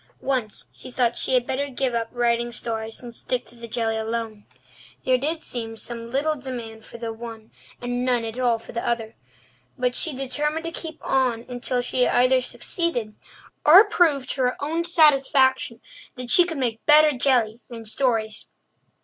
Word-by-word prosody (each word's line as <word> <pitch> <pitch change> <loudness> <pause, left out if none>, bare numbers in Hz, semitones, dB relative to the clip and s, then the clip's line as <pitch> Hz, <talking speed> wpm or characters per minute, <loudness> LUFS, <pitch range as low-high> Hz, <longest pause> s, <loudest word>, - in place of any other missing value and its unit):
Once 255 -6 -2
she - - -10
thought 245 -2 +1
she 260 - 0
had 245 -1 +2
better 275 +3 -2
give 260 -1 -1
up 230 -1 -1
writing 240 0 0
stories 225 0 -4
and 240 -1 -8
stick 250 +1 -3
to - - -18
the 235 -1 -10
jelly 225 -1 -1
alone. 220 -1 -4 0.6
There 255 -1 +3
did 315 +4 -2
seem 225 -2 -4
some 230 0 -5
little 280 +5 +1
demand 240 -6 -7
for - - -11
the 230 -1 -4
one 225 -1 -9 0.3
and 245 0 -2
none 245 -2 +1
at 225 +2 -6
all 240 -2 +2
for 225 - -12
the 235 - -3
other. 225 -2 -2 0.6
But 250 0 0
she 315 -5 +1
determined 295 +5 -2
to 330 - -3
keep 325 -1 -5
on 250 -3 +1
until 245 0 -2
she 250 0 +1
either 255 +1 +4
succeeded 250 - -2 0.5
or 355 +7 +9
proved 290 - +2
to 265 - -2
her 250 0 +2
own 325 +4 -1
satisfaction 275 -7 +4 0.3
that 250 -1 -5
she 355 - +7
could 335 -3 -4
make 235 -4 -2
better 305 0 +7
jelly 245 -4 +2
than 230 -2 -9
stories. 220 -2 -1
245 Hz, 175 wpm, -24 LUFS, 230-270 Hz, 0.6 s, or